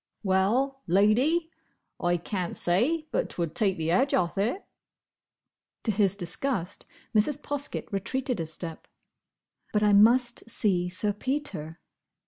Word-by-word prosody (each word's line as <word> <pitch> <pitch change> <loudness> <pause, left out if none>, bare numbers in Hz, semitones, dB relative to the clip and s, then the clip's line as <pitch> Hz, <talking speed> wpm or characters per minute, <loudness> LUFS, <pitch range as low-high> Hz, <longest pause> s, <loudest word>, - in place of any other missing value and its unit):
"Well, 225 +9 +1
Lady, 250 - +3 0.5
I 175 0 +1
can't 180 0 -4
say 255 - +1
but - - 0
'twould 170 -3 -3
take 195 -1 +1
the 160 0 -1
edge 265 +10 +3
off 170 -2 0
it." 225 - -1 1.2
To 225 - +1
his 200 -2 +2
disgust, 190 +1 -2 0.3
Mrs. 260 +7 +3
Poskett 290 -1 -3
retreated 245 +4 -2
a 165 - -2
step. 160 +1 -7 0.8
"But 210 0 +1
I 210 -1 +4
must 235 +3 +4
see 185 -6 +1
Sir 205 +3 +1
Peter." 210 - -4
205 Hz, 125 wpm, -27 LUFS, 180-260 Hz, 1.2 s, I